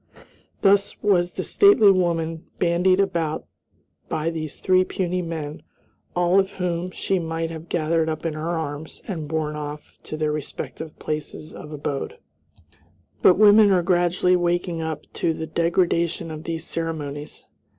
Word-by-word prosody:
Thus 200 0 +3
was 180 -4 +3
this - - -4
stately 265 - +7
woman 165 -3 0
bandied 180 +2 +3
about 165 -5 0 0.6
by 160 +1 -1
these 155 -2 -5
three 185 0 +4
puny 180 -1 -2
men, 160 -3 -5 0.5
all 175 +2 +4
of 190 0 +1
whom 180 -1 -2
she 190 +1 -1
might 165 0 -3
have 160 +1 -8
gathered 160 -1 +1
up 155 +1 -4
in 165 - 0
her 155 +2 -4
arms 155 0 -6
and 165 -8 -4
borne 155 -1 -2
off 150 0 -7
to 155 - -5
their 155 -1 0
respective 155 +1 -6
places 155 0 -5
of 150 - -9
abode. 145 -2 -4 1.0
But 180 - +6
women 210 0 +7
are 185 -3 +3
gradually 175 +1 +3
waking 175 -1 0
up 160 -2 -4
to 165 - 0
the 160 - -4
degradation 170 0 0
of 155 0 -7
these 165 -1 -3
ceremonies. 150 -3 -5
165 Hz, 150 wpm, -23 LUFS, 155-180 Hz, 1.0 s, stately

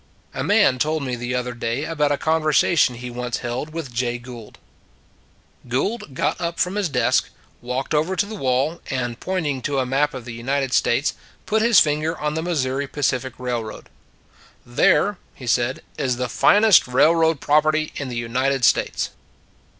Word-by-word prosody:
A - - -3
man 130 - +3
told 155 +2 0
me 130 -2 -2
the 120 +1 -3
other 125 0 -2
day 120 +3 -3
about 150 -3 0
a 145 - +1
conversation 155 -3 +2
he 125 +1 -7
once 125 0 -3
held 120 +6 -3
with 155 -6 -6
Jay 120 0 -1
Gould. 120 -3 -11 1.1
Gould 150 - -2
got - - -1
up 170 0 -3
from 180 - +1
his 205 -4 -1
desk, 125 -4 +1 0.3
walked 125 +4 -3
over 160 +5 +1
to 200 - +1
the 215 - -8
wall, 135 -2 0
and 125 -3 -3
pointing 155 -8 -2
to 140 +2 -2
a 130 - +1
map 135 +3 0
of 125 -3 -7
the 120 - -7
United 135 +3 -2
States, 130 +5 +2 0.3
put 220 0 +1
his 235 -1 +6
finger 155 +2 +1
on 150 0 -2
the 160 - -2
Mis 165 -6 -1
souri 135 +2 -3
Pacific 130 -3 -1
Railroad. 120 -3 -5 0.4
" - - -28 0.2
There," 150 +10 +2 0.2
he 130 - -10
said, 120 +2 0
" - - -28
is 125 -3 0
the 125 0 -2
finest 205 - +5
railroad 160 +4 +3
property 155 +2 +2
in 140 -2 -4
the 120 - -5
United 125 +3 0
States." - - +1
135 Hz, 180 wpm, -22 LUFS, 125-155 Hz, 1.1 s, his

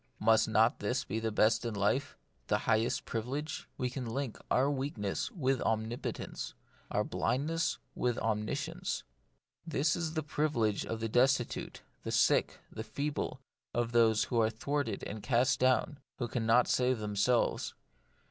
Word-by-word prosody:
Must 110 +1 +4
not 110 +2 +4
this 125 +5 0
be 110 - -3
the 110 0 -1
best 110 +2 +3
in 115 -3 -3
life, 125 +8 0 0.3
the - - +3
highest 115 +1 +1
privilege? 140 +7 -3
We 125 - 0
link 130 0 -3
our 135 +3 +3
weak 140 -1 -3
ness 100 -2 -2
with 135 - 0
omnipotence; 110 +2 -3 0.3
our - - +1
blindness 160 +5 0 0.2
with 125 -1 0
omniscience. 105 -1 -2 0.6
This 155 -2 +1
is 165 -1 -3
the 155 - 0
privilege 140 -8 0
of 115 0 -3
the 115 - 0
destitute, 125 +2 +1 0.2
the - - -4
sick, - - +3
the 110 - -5
feeble, 140 +1 -3 0.3
of 120 -1 0
those 115 -2 +4
who 120 -2 +1
are 110 - +3
thwarted 130 +3 -2
and 105 0 -5
cast 125 +2 +2
down, 130 +3 +2 0.2
who 120 - -2
cannot 120 +1 +3
save 125 0 +2
themselves. 105 +3 +1
120 Hz, 145 wpm, -32 LUFS, 110-140 Hz, 0.6 s, Must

